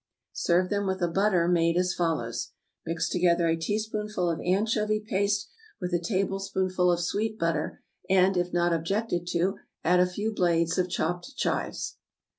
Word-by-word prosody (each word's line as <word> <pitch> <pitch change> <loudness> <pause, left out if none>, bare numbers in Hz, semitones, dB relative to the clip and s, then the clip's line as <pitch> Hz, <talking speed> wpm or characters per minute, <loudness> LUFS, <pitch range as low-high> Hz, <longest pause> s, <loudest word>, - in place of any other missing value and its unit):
Serve 180 +2 +1
them 200 -1 0
with 190 0 -1
a - - +3
butter 180 -1 +2
made 170 -1 +3
as 180 0 +2
follows: 155 -10 -2 0.3
Mix 165 +1 -1
together 170 -1 +2
a 165 - +3
teaspoonful 210 +1 -2
of 165 - -3
anchovy 215 +3 +1
paste 205 0 0 0.3
with 180 -1 -4
a 175 - +3
tablespoonful 190 -1 0
of 175 - +1
sweet 215 +5 -1
butter, 165 -3 -2 0.3
and, 190 0 +4
if 180 0 0
not 175 0 +2
objected 175 +2 -1
to, 180 +3 0 0.2
add 180 +2 +4
a 180 - +5
few 210 +4 -2
blades 170 -2 +2
of 180 0 +1
chopped 175 - -2
chives. - - -2
180 Hz, 160 wpm, -27 LUFS, 170-205 Hz, 0.3 s, a